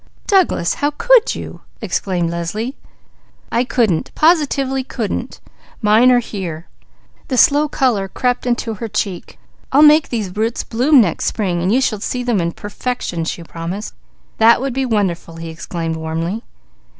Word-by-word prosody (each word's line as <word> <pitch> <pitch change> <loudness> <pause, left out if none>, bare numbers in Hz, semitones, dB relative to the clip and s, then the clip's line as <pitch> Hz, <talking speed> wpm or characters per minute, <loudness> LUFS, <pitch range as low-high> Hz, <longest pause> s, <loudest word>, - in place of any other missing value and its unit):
"Douglas, 370 - +2
how 290 - 0
can 475 +11 +3 0.2
you!" - - -8 0.2
exclaimed 175 -3 -1
Leslie. 210 - -3 0.8
"I 235 - +2
couldn't! 225 -9 0
Positively 280 -5 +2
couldn't! 230 -5 -4 0.4
Mine 220 +4 +5
are 250 - +5
here!" 185 -8 -4 0.6
The 260 - -2
slow 295 +4 +5
colour 245 -9 0
crept 250 +4 -1
into 240 -2 -1
her 225 +2 -5
cheek. 195 -4 -4 0.3
"I'll 285 +3 +6
make 300 0 +6
those 210 -6 -3
roots 225 +2 -1
bloom 255 +4 +4
next 175 -7 -1
spring; 180 -4 -1
you 245 +6 +3
shall 215 -5 0
see 250 +4 -3
them 235 -6 +1
in 170 0 -2
perfection," 205 -5 -4
she 170 - -4
promised. 170 +6 -6 0.5
"That 225 +1 +6
would 270 0 -2
be 265 +1 -1
wonderful!" 190 -7 -1
he 165 0 -7
exclaimed 165 0 -4
warmly. 165 +6 -3
220 Hz, 150 wpm, -18 LUFS, 175-255 Hz, 0.8 s, I'll